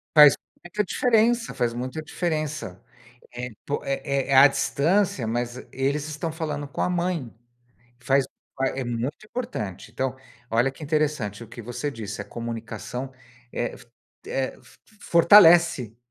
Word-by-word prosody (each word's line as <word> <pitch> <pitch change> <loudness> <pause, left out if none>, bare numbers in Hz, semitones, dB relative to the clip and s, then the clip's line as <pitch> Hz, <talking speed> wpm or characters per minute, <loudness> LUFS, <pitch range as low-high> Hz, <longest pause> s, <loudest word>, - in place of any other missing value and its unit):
Faz 150 -2 +10 0.3
muita 210 +4 -1
diferença, 230 +2 +2
faz 120 -2 0
muita 130 +6 -4
diferença. 155 - -3 0.5
Eh, 125 +1 -5 0.2
po 145 - -2
é 135 0 -1
é 135 - +3
à 140 - +10
distância, 150 - +1
mas 120 +2 -2
eles 140 +3 -1
estão 155 +2 -4
falando 150 -3 -4
com 140 - -5
a - - +1
mãe. 175 -8 -1 0.7
Faz 135 +2 +3 0.3
fa 135 - +1
é 135 -1 -3
muito 120 - -3
importante. 105 - -5
Então, 130 +1 -2 0.3
olha 120 +4 +3
que 135 - -15
interessante 145 -9 -1
o 110 - -16
que 120 0 -9
você 125 +5 -4
disse: 105 -4 -6
"A - - -4
comunicação 115 +2 -6 0.4
eh, 120 - -2
f - - -15 0.4
eh, 135 -1 -2
f - - -21
f - - -20 0.2
fortalece, 170 - +6
135 Hz, 150 wpm, -25 LUFS, 120-160 Hz, 0.7 s, Faz